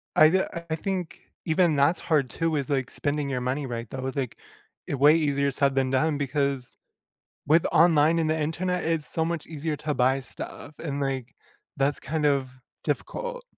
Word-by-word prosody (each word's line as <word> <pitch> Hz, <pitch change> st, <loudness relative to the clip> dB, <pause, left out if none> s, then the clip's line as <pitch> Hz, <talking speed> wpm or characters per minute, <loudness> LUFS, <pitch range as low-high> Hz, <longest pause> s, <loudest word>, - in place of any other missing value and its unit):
I 155 Hz, 0 st, +8 dB
ju 190 Hz, 0 st, +3 dB, 0.3 s
I -, -, +2 dB
think 180 Hz, 0 st, -4 dB, 0.2 s
even 165 Hz, -1 st, +3 dB
that's 145 Hz, +5 st, +3 dB
hard 150 Hz, -5 st, +1 dB
too 165 Hz, -1 st, 0 dB
is, 140 Hz, -2 st, -2 dB
like, 135 Hz, -2 st, 0 dB
spending 145 Hz, -1 st, -2 dB
your 125 Hz, -2 st, -2 dB
money 135 Hz, +3 st, -1 dB
right 115 Hz, -1 st, -4 dB
though, 130 Hz, 0 st, -3 dB
like, 130 Hz, -4 st, -3 dB, 0.5 s
way 145 Hz, +2 st, +5 dB
easier 140 Hz, -3 st, +1 dB
said 140 Hz, 0 st, +1 dB
than 135 Hz, -1 st, +1 dB
done 145 Hz, +3 st, +2 dB
because, 140 Hz, -2 st, -1 dB, 0.7 s
with 160 Hz, +3 st, +4 dB
online 160 Hz, 0 st, +5 dB
and 160 Hz, -1 st, +1 dB
the 160 Hz, 0 st, +1 dB
Internet, 175 Hz, +4 st, -1 dB
it's 160 Hz, -2 st, -1 dB
so 160 Hz, -, 0 dB
much 165 Hz, -2 st, -3 dB
easier 155 Hz, 0 st, -3 dB
to 150 Hz, 0 st, -2 dB
buy 130 Hz, +1 st, +2 dB
stuff, 145 Hz, +2 st, -9 dB
and, 140 Hz, -3 st, -3 dB
like, 135 Hz, -2 st, -3 dB, 0.4 s
that's 140 Hz, +1 st, +1 dB
kind 155 Hz, +1 st, -2 dB
of 140 Hz, -3 st, +2 dB, 0.4 s
difficult. -, -, -3 dB
145 Hz, 175 wpm, -26 LUFS, 135-160 Hz, 0.7 s, I